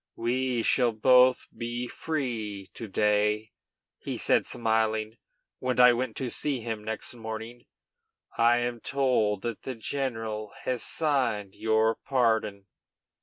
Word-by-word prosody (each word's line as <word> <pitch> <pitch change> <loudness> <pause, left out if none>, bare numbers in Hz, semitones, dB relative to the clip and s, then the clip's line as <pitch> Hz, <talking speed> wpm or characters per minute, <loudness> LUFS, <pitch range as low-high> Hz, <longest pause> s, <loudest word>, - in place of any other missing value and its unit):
"We 125 0 0
shall 120 -1 +3
both 125 +3 +5
be 120 +1 -4
free 115 -11 -4
to 115 - -7
day," 105 +2 +1 0.5
he - - -5
said, - - +2
smiling, 110 -1 0 0.4
when 125 -1 -1
I 125 0 +8
went 120 -1 -2
to 130 -2 -2
see 140 -4 -1
him 110 -1 -4
the 105 - -15
next 110 +2 -3
morning. 115 +1 -7 0.7
"I 120 +1 +4
am 120 -1 -2
told 120 -7 +1
that 115 -2 -4
the 130 - -5
general 110 -4 -3
has 125 -2 -1
signed 125 -11 0
your 110 0 +2
pardon." 110 -6 +1
115 Hz, 130 wpm, -28 LUFS, 110-125 Hz, 0.7 s, I